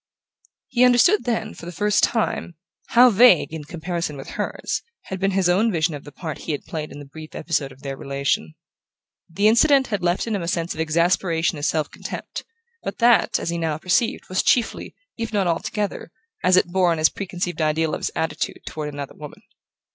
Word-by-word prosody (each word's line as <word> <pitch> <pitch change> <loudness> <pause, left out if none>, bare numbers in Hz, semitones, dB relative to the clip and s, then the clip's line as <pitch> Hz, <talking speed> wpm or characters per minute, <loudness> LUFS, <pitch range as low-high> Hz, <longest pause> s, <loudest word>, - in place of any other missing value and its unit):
He 245 - +3
understood 250 - +5
then, 225 -3 -1
for 170 - -10
the - - -5
first 205 +4 +1
time, 220 -6 0 0.3
how 245 +1 +6
vague, 210 -7 +5
in 155 -2 -6
comparison 170 -1 -4
with 135 - -9
hers, - - -3 0.2
had 190 - -6
been 195 +1 +2
his 190 -2 +1
own 200 +6 +3
vision 165 -2 +1
of 145 - -8
the 145 - -10
part 155 0 -6
he 160 - -3
had 145 - -5
played 155 -1 -5
in - - -9
the 145 - -9
brief 155 +3 -11
episode 150 -4 -1
of 135 0 -17
their 135 -1 -4
relation. 140 - -2 0.7
The 200 +6 +2
incident 270 +4 +4
had 205 -4 -1
left 175 +1 +1
in 225 -2 -1
him 200 - -2
a 170 - -4
sense 170 0 -1
of - - -10
exasperation 170 +1 +1
and - - -8
self 155 -2 -1
contempt, - - -7 0.4
but - - -5
that, 240 -1 +4
as - - -3
he 170 - -2
now 160 -2 -1
perceived, 180 +7 0
was 185 - +1
chiefly, 240 -3 +1 0.2
if 230 -1 -3
not 205 -3 +1
altogether, 200 +4 -2 0.3
as 185 0 +5
it 175 -1 +2
bore 185 -2 +3
on 165 - 0
his 155 0 +4
preconceived 175 -4 -4
ideal 155 0 +1
of - - -2
his - - -2
attitude 160 - -2
toward 150 -1 -5
another 145 -1 -6
woman. 150 -1 -11
175 Hz, 205 wpm, -22 LUFS, 155-205 Hz, 0.7 s, how